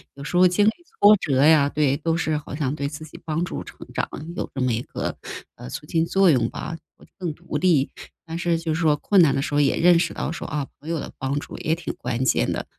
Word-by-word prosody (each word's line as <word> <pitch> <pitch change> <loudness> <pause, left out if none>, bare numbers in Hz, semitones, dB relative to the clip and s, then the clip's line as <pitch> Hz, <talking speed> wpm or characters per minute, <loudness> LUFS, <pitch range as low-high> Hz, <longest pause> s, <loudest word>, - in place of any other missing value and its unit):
有 140 - -9
时 175 - -5
候 180 +1 +7
经 190 +4 +2
历 220 - +5 0.3
挫 205 +1 +8
折 140 -6 +1
呀， 150 -2 +6
对， 145 -2 +1
都 165 +1 0
是 155 -3 0
好 145 - -7
像 145 -2 -1
对 140 -2 -2
自 150 +1 -8
己 155 - -12
帮 165 +2 -1
助 - - -4
成 - - -13 0.2
长 - - -1 0.3
有 - - -3
这 135 - -2
么 125 -2 +1
一 115 - -1
个， - - -4 0.4
呃， 60 - -9
促 150 - -7
进 165 +1 +1
作 190 0 +4
用 120 -4 +2
吧， 165 - -6 0.2
会 - - -18
更 175 -4 -2
独 165 -2 -5
立， 150 -5 +2 0.3
但 165 0 -5
是 170 -1 +1
就 165 -1 -2
是 165 - -2
说 155 -2 +4
困 195 +5 +3
难 155 -4 +4
的 135 - 0
时 - - -4
候 145 - +3
也 140 - +2
认 175 0 +5
识 - - 0
到 - - -3
说， - - -6
啊， 145 -3 -3
朋 155 - -10
友 165 -2 -1
的 - - -6
帮 135 +2 -1
助 - - -9
也 160 - 0
挺 170 -1 -5
关 120 +2 -2
键 - - +2
的。 - - -3
155 Hz, 285 characters per minute, -23 LUFS, 140-170 Hz, 0.4 s, 挫